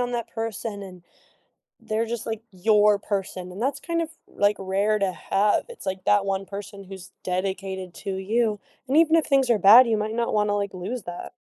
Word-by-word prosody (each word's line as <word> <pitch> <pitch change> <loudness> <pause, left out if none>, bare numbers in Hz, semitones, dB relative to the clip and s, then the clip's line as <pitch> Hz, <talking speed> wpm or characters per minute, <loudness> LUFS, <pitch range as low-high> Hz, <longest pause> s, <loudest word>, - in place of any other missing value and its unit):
on 245 0 -1
that 235 -1 -3
person 225 -2 -4
and 185 -2 -11 0.8
they're 220 +1 -2
just, 235 -1 -5
like, 225 -1 -4
your 210 +2 +3
person, 190 -3 -4
and 200 +6 -6
that's 275 +2 0
kind 335 -1 -1
of, 325 - -4 0.2
like, 205 0 +1
rare 200 +3 0
to 195 -2 0
have, 205 +3 +1
it's 480 - -11
like 190 0 -3
that 205 -1 +3
one 195 0 -1
person 200 0 -8
who's 190 -2 -11
dedicated 190 0 -3
to 195 -1 -5
you, 215 +2 0 0.3
and 275 - +1
even 325 0 +5
if 325 -2 +4
things 270 -2 +3
are 230 -3 +3
bad, 235 +6 +9
you 225 -2 +1
might 215 +1 -2
not 235 -1 -1
wanna, 210 -1 +2
like, 200 -2 -3
lose 200 +5 -5
that. 175 0 -7
205 Hz, 205 wpm, -24 LUFS, 195-230 Hz, 0.8 s, bad